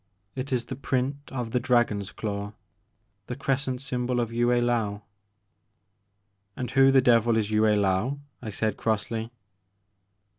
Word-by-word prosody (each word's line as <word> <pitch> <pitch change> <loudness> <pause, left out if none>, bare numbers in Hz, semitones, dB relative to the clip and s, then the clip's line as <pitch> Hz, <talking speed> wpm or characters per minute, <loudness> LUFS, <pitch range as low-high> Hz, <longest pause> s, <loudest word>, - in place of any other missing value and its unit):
It 135 +1 -5
is 125 -2 0
the 130 - -5
print 135 +1 -1
of 125 -4 -4
the 125 - +2
dragon's 115 -5 +1
claw, 105 -1 -4 0.4
— 100 -2 -46
^the 125 - -5
crescent 130 -2 -1
symbol 125 -2 -1
of 115 -1 -2
Yue 120 +1 +2
I^ou 120 -4 +1 0.7
'* 100 0 -47
"And 125 -1 -4
who 135 +1 +6
the 135 -1 +5
devil 115 -2 +4
is 110 -1 0
Yue 105 0 +3
I^ou?" 105 +4 +2 0.2
I 115 - -5
said 110 +1 -2
crossly. 110 +1 -2
115 Hz, 150 wpm, -26 LUFS, 105-125 Hz, 0.7 s, who